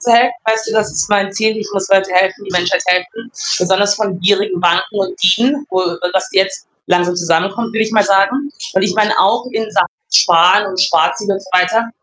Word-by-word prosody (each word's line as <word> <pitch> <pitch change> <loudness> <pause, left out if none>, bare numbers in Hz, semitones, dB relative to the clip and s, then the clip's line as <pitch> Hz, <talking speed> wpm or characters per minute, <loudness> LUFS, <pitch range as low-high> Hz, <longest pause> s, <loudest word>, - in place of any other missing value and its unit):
zu 240 -1 +1
helfen, 245 +1 +4
weißt 220 0 -1
du, - - -4
das 215 -1 0
ist - - -1
mein 200 -1 0
Ziel. 220 +1 0
Ich 215 - -6
muss 195 -1 -3
Leuten 195 -1 +2
helfen, 190 +2 +1
die 195 - -9
Menschheit 180 0 0
helfen, 180 +6 -1 0.3
besonders 190 +3 +2
von 205 -3 -3
gierigen 195 -1 +1
Banken 175 +4 +1
und 195 0 -4
Dieben, 250 +10 +2
wo, 185 0 0
äh 180 0 -3
dass 190 - -1
die - - +1
jetzt 195 -1 -1 0.2
langsam 175 0 0
zusammenkommen, 185 +7 -1
will 225 - -2
ich 220 0 -4
mal 210 -2 +3
sagen 200 +9 +1 0.2
und 190 - +1
ich 195 -1 0
meine 215 0 +1
auch 200 +5 +2
in 220 -1 -3
Sachen 200 -4 +1 0.3
Sparen 180 +4 +4
und 185 -1 -4
Sparziel 185 +5 +1
und 195 -1 -2
so 190 - -16
weiter, 185 +6 +1
195 Hz, 220 wpm, -15 LUFS, 180-220 Hz, 0.3 s, helfen